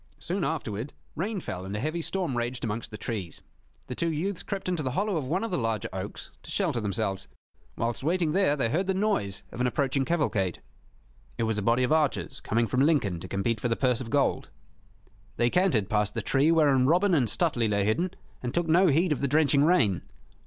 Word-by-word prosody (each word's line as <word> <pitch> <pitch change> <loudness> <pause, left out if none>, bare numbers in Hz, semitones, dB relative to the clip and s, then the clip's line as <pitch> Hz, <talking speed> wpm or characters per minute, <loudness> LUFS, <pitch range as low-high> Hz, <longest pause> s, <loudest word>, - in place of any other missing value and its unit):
Soon 185 +1 -3
afterward 135 -5 -3 0.2
rain 200 +5 -2
fell 90 - -5
and 95 +2 -5
a - - -2
heavy 155 +7 -2
storm 175 -5 -2
raged 120 +1 -2
amongst 115 0 -3
the 105 - -8
trees. 100 -7 -5 0.4
The 125 - -5
two 165 +6 -1
youths 175 +4 -2
crept 195 -2 -5
into 180 -3 0
the 130 -3 -2
hollow 205 0 +1
of 145 -5 -2
one 180 +9 0
of 230 - -3
the 180 - 0
larger 115 -3 -1
oaks 95 +2 -6
to - - -13
shelter 120 - 0
themselves. 100 -2 -2 0.5
Whilst 115 0 -1
waiting 165 +1 +1
there 185 -4 +3
they 130 -6 0
heard 180 +9 0
the 190 - +1
noise 190 - 0
of 125 - -5
an 125 - +3
approaching 135 +1 0
cavalcade. 130 - 0 0.8
It - - 0
was 110 -1 0
a - - -2
body 115 +5 +2
of 125 - 0
archers 155 -3 +1
coming 115 +2 +1
from 130 +3 0
Lincoln 135 - +2
to 90 - -7
compete 100 +4 -1
for 125 - -1
the 115 - +1
purse 125 -1 +1
of 120 - -6
gold. 140 +1 +1 0.9
They 120 0 +2
cantered 170 - +2
past 105 -1 0
the - - -2
tree 140 +4 +3
wherein 140 -6 +4
Robin 180 +5 +3
and 135 -8 +3
Stuteley 120 - +1
lay 100 -1 +1
hidden, 165 - +1 0.3
and 125 0 -4
took 170 -1 +1
no 175 +4 +5
heed 165 +3 +3
of 150 - 0
the 140 - +1
drenching 145 0 +3
rain. 130 - +3
135 Hz, 215 wpm, -27 LUFS, 110-165 Hz, 0.9 s, no